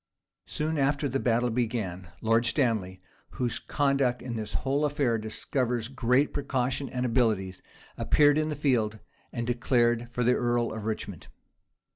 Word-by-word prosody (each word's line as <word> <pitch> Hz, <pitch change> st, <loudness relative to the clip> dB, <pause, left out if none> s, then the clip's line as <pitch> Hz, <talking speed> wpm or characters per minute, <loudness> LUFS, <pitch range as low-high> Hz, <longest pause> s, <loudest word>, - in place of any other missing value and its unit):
Soon 155 Hz, 0 st, -1 dB
after 145 Hz, +1 st, +1 dB
the 135 Hz, +1 st, -1 dB
battle 120 Hz, 0 st, +1 dB
began, 110 Hz, -7 st, -2 dB
Lord 115 Hz, +1 st, +2 dB
Stanley, 105 Hz, -9 st, 0 dB, 0.3 s
whose 120 Hz, -2 st, -1 dB
conduct 135 Hz, -4 st, +1 dB
in 120 Hz, -2 st, -4 dB
this 110 Hz, -1 st, -5 dB
whole 140 Hz, +2 st, 0 dB
affair 140 Hz, -6 st, +1 dB
discovers 115 Hz, +2 st, -2 dB
great 130 Hz, +2 st, +2 dB
precaution 135 Hz, -1 st, -1 dB
and 125 Hz, -1 st, -2 dB
abilities, 110 Hz, -7 st, +1 dB, 0.4 s
appeared 145 Hz, 0 st, +4 dB
in 155 Hz, 0 st, 0 dB
the 150 Hz, -, -2 dB
field, 120 Hz, -7 st, +1 dB, 0.3 s
and 120 Hz, -, -3 dB
declared 120 Hz, -1 st, +1 dB
for 125 Hz, -, -1 dB
the 125 Hz, +1 st, +4 dB
earl 120 Hz, -1 st, 0 dB
of 110 Hz, -1 st, -6 dB
Richmond. 105 Hz, -5 st, -4 dB
120 Hz, 145 wpm, -28 LUFS, 115-135 Hz, 0.4 s, appeared